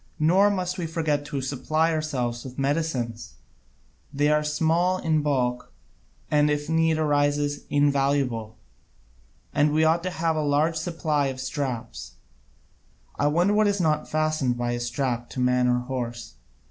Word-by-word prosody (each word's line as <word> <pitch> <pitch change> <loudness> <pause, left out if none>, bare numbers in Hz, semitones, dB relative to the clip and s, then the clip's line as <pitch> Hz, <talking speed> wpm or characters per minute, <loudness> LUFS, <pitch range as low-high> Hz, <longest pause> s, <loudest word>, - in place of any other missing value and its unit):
Nor 185 +7 +4
must 185 -2 -2
we 170 - -2
forget 155 -3 -1
to 145 -2 -4
supply 155 +5 0
ourselves 125 -7 -2
with 130 -1 -10
medicines 135 - -2 0.8
they 145 +1 +1
are 150 0 +2
small 165 +4 +1
in 160 -4 +1
bulk 125 -4 -1 0.6
and, 150 0 +4
if 145 0 -1
need 160 0 +2
arises, 145 -1 0
invaluable. 140 -6 +1 1.0
And 145 +1 +3
we 155 +1 +2
ought 160 +2 +3
to 185 - -2
have 165 -2 -1
a 155 - 0
large 150 +3 +1
supply 160 -3 -1
of 130 -1 -5
straps 120 - -4 1.1
I 145 - +3
wonder 175 +7 +2
what 210 0 +3
is 205 -1 0
not 155 -3 0
fastened 155 -5 0
by 120 0 -1
a 120 - -2
strap 120 0 -2
to - - -7
man 125 0 +2
or 125 0 +2
horse? 120 - -5
145 Hz, 150 wpm, -25 LUFS, 125-160 Hz, 1.1 s, Nor